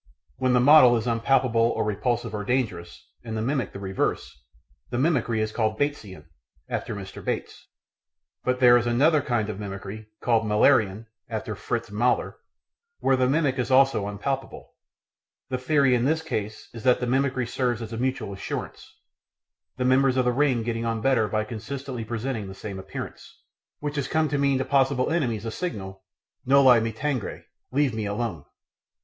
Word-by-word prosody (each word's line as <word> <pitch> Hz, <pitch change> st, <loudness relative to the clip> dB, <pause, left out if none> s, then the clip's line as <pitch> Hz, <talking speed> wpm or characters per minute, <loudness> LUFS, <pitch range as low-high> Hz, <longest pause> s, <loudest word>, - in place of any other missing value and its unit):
When 130 Hz, -1 st, +1 dB
the 125 Hz, -, +5 dB
model 130 Hz, -2 st, +7 dB
is 115 Hz, -, -3 dB
unpalatable 120 Hz, 0 st, +2 dB
or 115 Hz, +1 st, +2 dB
repulsive 115 Hz, +2 st, -1 dB
or 105 Hz, -1 st, -3 dB
dangerous, 100 Hz, -8 st, -2 dB, 0.2 s
and 110 Hz, -2 st, -5 dB
the -, -, -1 dB
mimic 130 Hz, -3 st, -1 dB
the -, -, -8 dB
reverse, 95 Hz, -1 st, -2 dB, 0.5 s
the 120 Hz, -, -3 dB
mimicry 125 Hz, -6 st, +1 dB
is 110 Hz, 0 st, -1 dB
called 110 Hz, -1 st, -1 dB
"Batesian" 105 Hz, -, -3 dB, 0.4 s
(after -, -, -3 dB
Mr. -, -, -8 dB
Bates), -, -, -4 dB, 0.8 s
but 125 Hz, 0 st, 0 dB
there 120 Hz, -1 st, +7 dB
is 120 Hz, 0 st, -1 dB
another 145 Hz, +6 st, +3 dB
kind 120 Hz, -5 st, -1 dB
of 105 Hz, -2 st, -5 dB
mimicry 100 Hz, +1 st, -7 dB
called 115 Hz, -2 st, +2 dB
Müllerian 105 Hz, -1 st, +3 dB, 0.2 s
(after 110 Hz, -1 st, -4 dB
Fritz 115 Hz, +2 st, -4 dB
Müller) 120 Hz, +4 st, +1 dB, 0.7 s
where 135 Hz, -, +3 dB
the 130 Hz, -1 st, +2 dB
mimic 140 Hz, -3 st, +1 dB
is 125 Hz, -, -1 dB
also 130 Hz, -6 st, +4 dB
unpalatable. 130 Hz, +7 st, -4 dB, 0.8 s
The 130 Hz, -1 st, -2 dB
theory 140 Hz, -1 st, +3 dB
in 120 Hz, 0 st, +2 dB
this 160 Hz, +3 st, +1 dB
case 110 Hz, -8 st, -4 dB
is 115 Hz, -, -8 dB
that 125 Hz, 0 st, +3 dB
the 125 Hz, -, -1 dB
mimicry 130 Hz, 0 st, 0 dB
serves 120 Hz, -1 st, -1 dB
as 115 Hz, -1 st, -7 dB
mutual 125 Hz, -3 st, -2 dB
assurance, 95 Hz, -, -6 dB, 0.9 s
the 125 Hz, -, -1 dB
members 130 Hz, 0 st, +3 dB
of 130 Hz, -, +2 dB
the 125 Hz, -, +3 dB
ring 130 Hz, -3 st, +1 dB
getting 115 Hz, 0 st, -2 dB
on 115 Hz, -1 st, -2 dB
better 120 Hz, -3 st, +2 dB
by 110 Hz, +1 st, -1 dB
consistently 125 Hz, +3 st, -6 dB
presenting 115 Hz, -1 st, -4 dB
the 95 Hz, -, -9 dB
same 100 Hz, -2 st, -7 dB
appearance, 95 Hz, -, -8 dB, 0.4 s
which 145 Hz, 0 st, -3 dB
has 140 Hz, -2 st, -1 dB
come 155 Hz, +1 st, +1 dB
to 145 Hz, 0 st, -1 dB
mean 140 Hz, -1 st, +2 dB
to 130 Hz, -, -1 dB
possible 135 Hz, 0 st, +2 dB
enemies 120 Hz, -, -1 dB
a 115 Hz, -, -3 dB
signal, 95 Hz, -, -5 dB, 0.4 s
Noli 130 Hz, -2 st, +6 dB
me 115 Hz, 0 st, -1 dB
tangere 130 Hz, 0 st, -3 dB, 0.3 s
("Leave 140 Hz, -1 st, +1 dB
me 110 Hz, -2 st, -3 dB
alone"). 100 Hz, -8 st, -3 dB
120 Hz, 170 wpm, -25 LUFS, 110-135 Hz, 0.9 s, model